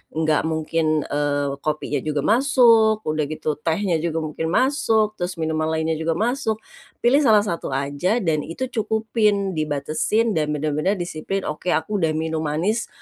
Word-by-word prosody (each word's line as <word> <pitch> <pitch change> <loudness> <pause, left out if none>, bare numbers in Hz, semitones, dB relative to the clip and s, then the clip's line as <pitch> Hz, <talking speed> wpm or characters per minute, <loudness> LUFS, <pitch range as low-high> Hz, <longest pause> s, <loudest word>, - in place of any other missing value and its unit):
nggak 155 -1 +1
mungkin, 160 -1 0
eee, 145 -1 -1
kopinya 150 -1 -2
juga 150 0 -2
masuk, 225 - +4
udah 155 -1 -1
gitu 155 0 -3
tehnya 165 +2 0
juga 165 0 -2
mungkin 155 +1 -3
masuk, 220 - +1
terus 180 +1 -3
minuman 160 -1 -1
lainnya 160 0 -1
juga 160 0 0
masuk, 220 +1 -1 0.4
pilih 250 +4 +5
salah 220 -8 +5
satu 170 -9 -3
aja 145 - 0
dan 160 -3 +1
itu 245 - -5
cukupin 215 -3 0
dibatesin 155 +8 0
dan 150 -5 0
bener-bener 150 +6 0
disiplin 175 +2 -4
oke 150 +4 -5
aku 180 +7 -1
udah 165 -3 +1
minum 160 0 -2
manis, 160 +9 -1
160 Hz, 150 wpm, -22 LUFS, 155-215 Hz, 0.4 s, pilih